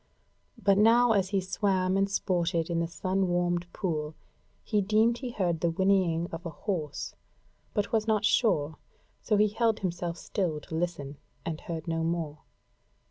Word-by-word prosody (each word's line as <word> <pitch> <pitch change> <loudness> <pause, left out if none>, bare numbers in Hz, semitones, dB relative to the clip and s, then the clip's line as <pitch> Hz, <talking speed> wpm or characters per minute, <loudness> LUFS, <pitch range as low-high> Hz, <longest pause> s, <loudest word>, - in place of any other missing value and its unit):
But 200 -3 +3
now, 230 +2 +6
as 195 -3 +2
he 200 -1 +1
swam 185 0 0
and 195 0 +2
sported 175 -4 0
in 170 - +1
the 170 - 0
sun 185 +3 -1
warmed 175 0 0
pool 155 -5 -3 0.5
he 210 -2 +1
deemed 220 +4 +3
he 255 - -4
heard 180 -8 -1
the 170 - +1
whinnying 175 -2 +2
of 165 +1 -6
a 170 - -4
horse, 155 -2 -4 0.6
but 205 -2 0
was 220 -1 +1
not 215 -1 +2
sure, 160 -11 +2 0.4
so 215 - +1
he 210 +1 +4
held 225 +1 +1
himself 175 -2 -2
still 170 -6 -2
to - - -11
listen, 160 -4 -3 0.3
and 160 -1 -4
heard 165 -1 -5
no 165 0 -1
more. 165 -3 -2
180 Hz, 165 wpm, -29 LUFS, 165-205 Hz, 0.6 s, now